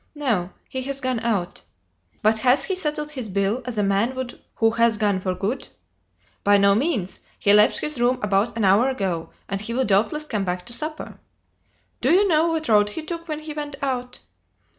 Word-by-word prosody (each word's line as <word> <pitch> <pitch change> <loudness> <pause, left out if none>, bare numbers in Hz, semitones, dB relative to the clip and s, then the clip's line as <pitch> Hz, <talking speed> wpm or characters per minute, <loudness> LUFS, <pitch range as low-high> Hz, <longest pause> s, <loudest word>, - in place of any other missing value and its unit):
"No. 225 -12 -1 0.2
He 260 - -4
has 275 +1 -4
gone 255 -3 -1
out." 210 -7 -2 0.6
"But 220 +1 +3
has 255 +4 +3
he 380 - -1
settled 300 -4 -2
his 255 -6 -4
bill, 200 +5 0
as 245 -3 -5
a 210 - +2
man 200 +6 +1
would 260 -1 -6
who 225 0 +3
has 230 -1 +2
gone 205 -3 +1
for 185 -1 -2
good?" 210 +8 -3 0.8
"By 205 0 +5
no 200 0 +5
means; 220 - -1 0.2
he 200 - +4
left 210 0 +5
his 300 -5 -3
room 250 +1 +3
about 205 +3 +1
an 220 - +1
hour 205 +7 +4
ago, 190 -10 -2 0.2
and 195 0 -3
he 230 +2 -4
will 260 +1 +1
doubtless 215 +10 +2
come 215 -9 -2
back 180 -1 -3
to 240 - -6
supper." 310 +4 -6 0.8
"Do - - +3
you 395 +4 +5
know 325 -2 +3
what 320 -2 -1
road 210 -1 +4
he 310 +10 -5
took 335 +1 -6
when 305 -1 -4
he 305 0 -7
went 295 -1 -5
out?" 250 -2 -2
235 Hz, 205 wpm, -23 LUFS, 200-290 Hz, 0.8 s, By